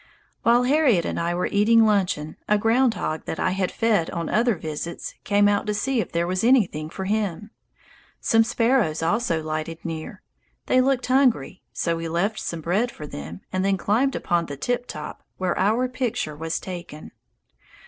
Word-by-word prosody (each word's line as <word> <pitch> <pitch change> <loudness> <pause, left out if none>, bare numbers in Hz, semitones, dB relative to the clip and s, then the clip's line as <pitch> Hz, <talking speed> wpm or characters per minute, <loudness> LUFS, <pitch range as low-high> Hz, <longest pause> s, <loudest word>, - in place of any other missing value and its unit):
While 240 +1 +4
Harriet 255 - +3
and - - -2
I 170 +1 -1
were 180 - 0
eating 225 +2 +4
luncheon, 185 -8 0
a 210 - +5
ground 230 +2 +3
hog 155 -4 -3
that - - -4
I 185 - +1
had 185 0 -1
fed 215 -7 +1
on 170 -1 -3
other 235 0 +2
visits 160 +1 -5
came 205 0 +3
out 205 0 +1
to 210 - 0
see 260 +2 0
if - - -6
there 170 0 0
was 185 +3 -1
anything 205 - +3
for 190 +3 -6
him. 210 0 -2 0.7
Some 225 -1 +4
sparrows 230 -8 +1
also 170 -3 0
lighted 155 +1 -4
near; 160 -2 -6 0.4
they 255 - +4
looked 265 -1 +1
hungry, 250 - +2
so 170 -1 -1
we 165 0 -4
left 195 +7 0
some 170 -1 -4
bread 195 +10 +1
for 155 - -9
them 80 - -8
and 185 0 0
then 195 0 +2
climbed 245 +8 +1
upon 170 -2 0
the 140 - -6
"tip 245 - -2
top," - - -7 0.2
where 185 -2 -1
our 220 +7 +2
picture 245 - -3
was 160 +2 -3
taken. 175 -4 -8
195 Hz, 180 wpm, -24 LUFS, 165-230 Hz, 0.7 s, a